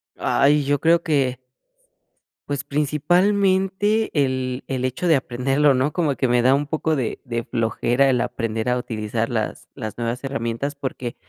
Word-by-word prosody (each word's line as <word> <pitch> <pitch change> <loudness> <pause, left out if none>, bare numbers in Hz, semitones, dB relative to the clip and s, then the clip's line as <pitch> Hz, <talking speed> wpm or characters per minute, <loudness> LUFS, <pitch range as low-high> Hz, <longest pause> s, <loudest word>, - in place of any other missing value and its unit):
Ay, 145 +1 +2
yo 145 0 +1
creo 165 +3 +4
que 135 -5 0 1.1
pues, 145 -2 -2
principalmente 190 +8 +1
el 130 -3 -1
el 130 -2 -3
hecho 130 +8 -2
de 165 - +5
aprenderlo, 135 +3 +2
¿no?, 130 +3 0
como 155 -6 0
que 130 - 0
me 120 0 +3
da 130 +2 +4
un 145 - -1
poco 160 +1 0
de 125 -6 -3
de 120 -1 -3
flojera 120 +4 +1
el 125 -2 +2
aprender 115 -1 -2
a 125 - +2
utilizar 110 -1 -3
las 110 -3 -3
las 110 -6 -6
nuevas 120 +2 -3
herramientas, 135 +1 -3
porque 130 -4 -5
135 Hz, 160 wpm, -22 LUFS, 120-150 Hz, 1.1 s, de